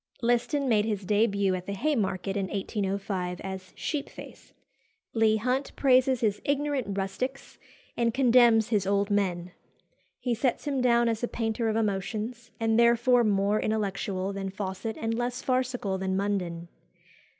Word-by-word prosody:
Liston 245 +4 +1
made 215 -4 +3
his 205 -3 -2
début 200 -2 +2
at 180 0 -7
the 200 - -3
Haymarket 195 -8 -1
in 195 -2 -1
1805 195 -2 -3
as 190 -1 -7
Sheepface. 295 -3 -6 0.6
Leigh 220 -1 +3
Hunt 255 +5 -1
praises 260 -1 +3
his 210 -3 0
ignorant 280 -7 -1
rustics, 225 +8 -4 0.4
and 235 -1 +1
condemns 240 -3 +5
his 205 -4 +1
old 200 +1 +1
men. 180 -3 0 0.7
He 245 - -1
sets 240 +5 -1
him 275 -3 0
down 240 -1 +3
as 225 -1 -1
a 240 - 0
painter 225 0 -1
of 215 - -1
emotions, 220 +3 -2
and 225 0 +2
therefore 235 +1 +4
more 205 0 +2
intellectual 200 -2 -2
than 195 0 -4
Fawcett 195 +2 -5
and 225 0 -1
less 245 +2 -2
farcical 250 -7 -1
than 190 0 -1
Munden. 180 -4 -2
220 Hz, 145 wpm, -28 LUFS, 195-240 Hz, 0.7 s, condemns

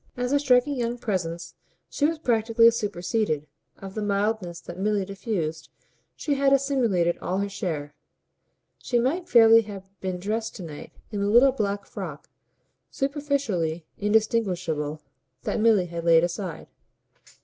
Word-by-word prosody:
As 245 +1 -1
a 285 - +4
striking 265 0 +3
young 240 0 -1
presence 175 -7 -3 0.3
she 290 - +1
was 325 +1 -2
practically 230 -4 +4
superseded; 200 -6 -1 0.3
of 195 -1 -9
the 215 - -4
mildness 200 -3 -1
that 175 +1 -9
Milly 205 -1 +1
diffused 185 -6 -4 0.5
she 295 - -1
had 275 0 +2
assimilated 245 -11 +2
all 180 +2 -2
her 200 +1 0
share; 160 -7 -4 0.9
she 245 - -1
might 290 +9 0
fairly 225 -1 +7
have 195 -3 -10
been 185 -1 -3
dressed 220 +4 -3
to 190 - -7
night 150 -3 -9 0.2
in 205 - -3
the 200 0 0
little 245 +5 +6
black 200 -5 -2
frock, 165 -7 -8 0.6
superficially 270 - -1
indistinguishable, 180 -8 0 0.4
that - - -1
Milly 215 -4 +4
had 170 -1 -6
laid 165 -1 +5
aside. 175 -1 -3
205 Hz, 140 wpm, -25 LUFS, 175-235 Hz, 0.9 s, fairly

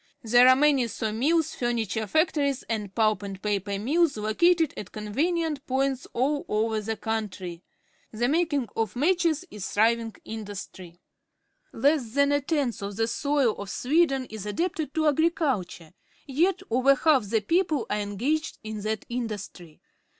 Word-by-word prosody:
There 240 +2 +6
are 255 - +7
many 275 -3 +3
saw 220 -1 -3
mills, 315 +8 +1
furniture 225 -3 -2
factories, 290 - +1
and 210 -4 -4
pulp 215 -3 +2
and 195 -2 -6
paper 200 -1 -2
mills 285 - +1
located 320 +10 +2
at 190 - -8
conven 260 +12 -1
ient 315 -3 -3
points 265 0 0
all 285 +4 0
over 220 0 0
the 220 +1 -3
country. 200 -6 -4 0.5
The 235 +2 0
making 295 -4 +1
of 225 -1 -1
matches 335 +3 +1
is 210 - -7
a - - -9
thriving 225 +1 +2
industry. 200 -5 -8 0.7
Less 265 -2 +1
than 280 0 +4
a 285 0 +2
tenth 280 -6 -1
of 200 0 -5
the 225 +2 +1
soil 280 -2 +1
of 200 -1 -6
Sweden 270 - +1
is 210 -2 -6
adapted 315 - -2
to 315 -1 +2
agriculture, 285 - 0 0.3
yet 330 +8 +1
over 260 +3 +4
half 275 -4 +3
the 225 0 +1
people 320 - +1
are 210 - 0
engaged 240 +10 -2
in 215 -1 -5
that 215 0 -3
industry. 210 -9 -6
240 Hz, 155 wpm, -26 LUFS, 215-295 Hz, 0.7 s, are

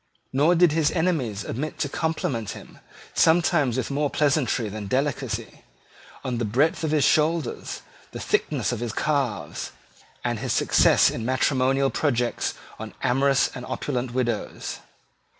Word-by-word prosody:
Nor 150 +6 +4
did 175 -1 +5
his 155 -1 +2
enemies 145 - -1
omit 150 +7 -4
to 145 - -1
compliment 140 -8 -2
him, - - -14 0.3
sometimes 160 -6 +3
with 130 +1 -2
more 145 +1 0
pleasantry 135 -6 +1
than 105 0 -6
delicacy, 130 -3 -2 0.6
on 125 -2 -2
the - - 0
breadth 135 +11 +1
of 160 - 0
his 150 -2 +2
shoulders, 155 -3 +1 0.3
the - - -7
thickness - - 0
of - - -3
his 120 -2 -3
calves, 130 - -2 0.5
and - - -1
his - - -1
success - - +4
in 115 - -4
matrimonial 130 +2 +2
projects 125 -5 0 0.2
on - - -8
amorous 135 +1 +3
and 125 - -7
opulent 130 -1 -3
widows. 120 -3 -3
135 Hz, 140 wpm, -25 LUFS, 120-150 Hz, 0.6 s, did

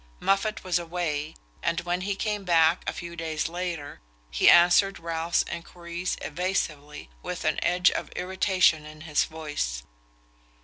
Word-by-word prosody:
Moffatt 195 +2 +1
was 180 -2 +1
away, 165 -3 -3 0.3
and 170 0 0
when 175 +1 -2
he 200 +1 -2
came 210 0 -2
back 165 -1 +4
a - - -1
few 170 0 -7
days 160 -2 -2
later 170 -4 -5 0.3
he - - +5
answered 175 +3 +6
Ralph's 165 0 0
enquiries 170 +1 -5
evasively, 150 - -3
with - - -5
an - - +1
edge 180 +1 +4
of - - -4
irritation 185 -3 +2
in 155 0 -11
his 155 -2 +1
voice. 150 - -4
170 Hz, 140 wpm, -27 LUFS, 155-180 Hz, 0.3 s, answered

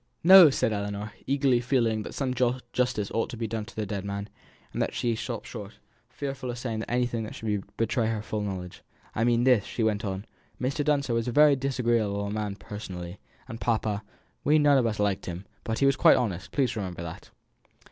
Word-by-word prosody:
"No!" 185 -1 +10
said 125 -4 0
Ellinor, 100 +1 -3 0.2
eagerly, 135 -3 +3
feeling 120 -3 +1
that - - -8
some 130 -2 -1
justice 125 -3 -1
ought 115 - 0
to 120 - -7
be 115 - -2
done 110 -1 -3
to 120 - -14
the 110 - -2
dead 100 -1 -4
man; 100 +1 -4 0.4
and - - -2
then - - +1
she 120 -2 0
stopped 115 0 -5
short, 105 -2 -8 0.4
fearful 135 -1 -5
of 120 - -4
saying 115 -3 -3
anything 120 -2 0
that 110 - -7
should 105 -3 -2
betray 115 0 +1
her 110 -2 -2
full 105 0 -3
knowledge. 95 -3 -5 0.3
"I 115 - 0
mean 120 0 +3
this," 125 -5 +5
she 115 - -3
went 105 -2 +1
on; 95 0 -3 0.3
"Mr. 135 +4 -1
Dunster 140 -4 +1
was 115 0 0
a - - 0
very 150 +2 +6
disagreeable 115 -6 0
man 105 -2 -3
personally 95 -4 -7 0.3
and 115 -3 -8
papa 110 -3 0 0.4
we 150 +2 +4
none 145 -2 +5
of 120 - +2
us 105 -2 -2
liked 100 -2 0
him; 90 +2 -5 0.2
but 110 0 -2
he 140 - +2
was 135 -1 +4
quite - - +6
honest 95 -8 -2
please 135 -3 +1
remember 90 -5 -4
that." 80 -1 -8
115 Hz, 205 wpm, -27 LUFS, 105-125 Hz, 0.4 s, No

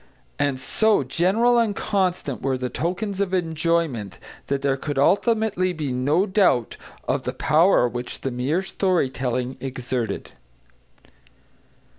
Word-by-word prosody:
And 140 -2 0
so 215 +5 +2
general 200 - +2
and 220 -3 +1
constant 180 - -1
were 135 -1 0
the 125 0 -3
tokens 195 +4 -2
of 190 -1 0
enjoyment 165 - -1 0.3
that 140 0 -1
there 140 -1 +2
could 145 +1 -4
ultimately 195 - +2
be 150 -5 -3
no 145 +9 +2
doubt 185 - +2 0.3
of - - 0
the - - -4
power 160 -4 +4
which 120 +1 -5
the 135 - -2
mere 135 +9 -1
story 185 -7 0
telling 125 0 -2
exerted. 125 -4 -4
155 Hz, 130 wpm, -23 LUFS, 130-190 Hz, 0.3 s, power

